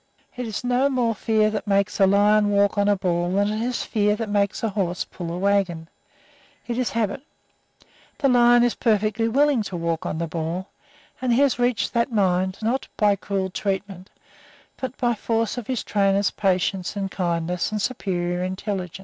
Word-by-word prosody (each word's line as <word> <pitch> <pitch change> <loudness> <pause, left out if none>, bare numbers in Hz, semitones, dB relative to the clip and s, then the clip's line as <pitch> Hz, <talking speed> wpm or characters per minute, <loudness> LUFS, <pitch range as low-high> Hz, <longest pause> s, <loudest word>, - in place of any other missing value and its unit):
It 250 -1 -4
is 220 +3 -4
no 250 +3 +2
more 245 -4 +1
fear 215 0 +1
that 210 0 -4
makes 200 +1 +1
a 195 - +6
lion 205 +1 +4
walk 200 0 +2
on 205 -1 +2
a 205 - +4
ball 175 -2 -1
than 200 +1 +2
it 215 - -2
is 245 +1 -2
fear 210 -2 +1
that 220 0 -4
makes 200 0 0
a 225 - +1
horse 190 -3 -2
pull 170 -2 -7
a 175 - -4
wagon. 185 -4 0 0.8
It 240 0 -3
is 250 - 0
habit. 220 +1 -2 1.0
The 280 - +2
lion 240 -1 +5
is 245 - +2
perfectly 215 -1 +1
willing 275 +1 +3
to 195 -3 -5
walk 170 +1 -2
on 155 - -3
the 170 - -1
ball, 165 +3 -4 0.5
and 255 -1 0
he 240 +4 +3
has 280 -3 +2
reached 245 -2 0
that 235 +2 +1
mind, 185 -3 +1
not 250 +5 -1
by 205 -2 +3
cruel 190 -1 -3
treatment, 195 -1 -4 0.7
but 260 0 -6
by 240 -1 +1
force 225 +1 -1
of 230 - -9
his 255 -3 -2
trainer's 200 -1 +1
patience 190 -1 0
and 195 -1 -3
kindness 175 0 -1
and 215 - -2
superior 180 -6 -2
intelligence. 185 -1 -4
205 Hz, 185 wpm, -23 LUFS, 185-230 Hz, 1.0 s, a